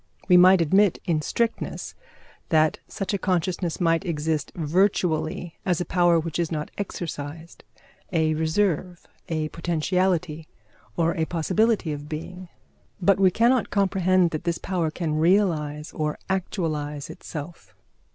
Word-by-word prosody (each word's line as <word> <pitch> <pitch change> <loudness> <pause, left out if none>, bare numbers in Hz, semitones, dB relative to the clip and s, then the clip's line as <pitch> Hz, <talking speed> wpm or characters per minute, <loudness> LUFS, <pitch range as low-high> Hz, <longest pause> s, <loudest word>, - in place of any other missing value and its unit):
We 180 - +6
might 180 0 +7
admit, 190 +4 +3
in 160 -3 +1
strictness, 230 +8 -2 0.6
that 155 -1 +3
such 195 +1 -4
a 200 - 0
consciousness 180 -2 -1
might 165 0 +2
exist 155 -4 -2
virtually 170 -1 0
as 180 -3 0
a 175 - -2
power 175 -2 +3
which 165 0 -4
is 170 -1 -1
not 150 -2 -3
exercised, 165 -4 -6 0.5
a 160 -3 +2
reserve, 170 +2 -1 0.2
a 155 -2 -1
potentiality, 170 -1 -1 0.5
or 165 0 +1
a 160 - 0
possibility 185 +2 +1
of 145 0 -8
being; 180 +4 -7 0.5
but 195 +1 +3
we 190 -1 +6
cannot 235 +5 +2
comprehend 185 -3 +2
that 155 - -4
this 170 -1 -1
power 175 -4 -1
can 155 -1 -2
realise 160 -4 +1
or 150 -1 -2
actualize 155 -6 -3
itself. 145 - -9
170 Hz, 130 wpm, -25 LUFS, 155-185 Hz, 0.6 s, might